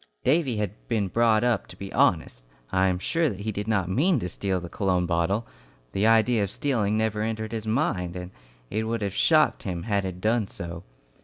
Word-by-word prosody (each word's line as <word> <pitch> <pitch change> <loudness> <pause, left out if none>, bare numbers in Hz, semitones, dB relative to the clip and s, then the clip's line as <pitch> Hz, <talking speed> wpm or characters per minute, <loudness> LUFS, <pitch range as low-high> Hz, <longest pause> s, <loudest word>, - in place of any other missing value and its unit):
Davy 135 -4 +2
had 105 -3 -1 0.2
been 105 -5 0
brought 115 +2 +3
up 120 -6 +1
to 90 - -12
be 100 0 -7
honest. 80 -8 +1 0.3
I 95 0 +3
am 90 -1 +1
sure 165 - +1
that 100 -4 -6
he 110 +1 -2
did 105 0 -4
not 100 -5 +1
mean 155 - +2
to 90 - -3
steal 95 +1 -1
the 85 - -7
cologne 90 -1 0
bottle. 85 +6 0 0.5
The 100 +3 +1
idea 115 0 +4
of 100 - -2
stealing 110 -6 0
never 110 -1 0
entered 110 0 -3
his 110 -1 -4
mind, 95 - 0
and 90 0 -6 0.4
it 110 +1 -1
would 115 -1 -2
have 100 -1 -2
shocked 155 +5 +3
him 90 -3 -4
had 100 -3 0
it 90 -1 -5
done 110 +1 +1
so. 85 -2 -7
105 Hz, 210 wpm, -26 LUFS, 95-115 Hz, 0.5 s, idea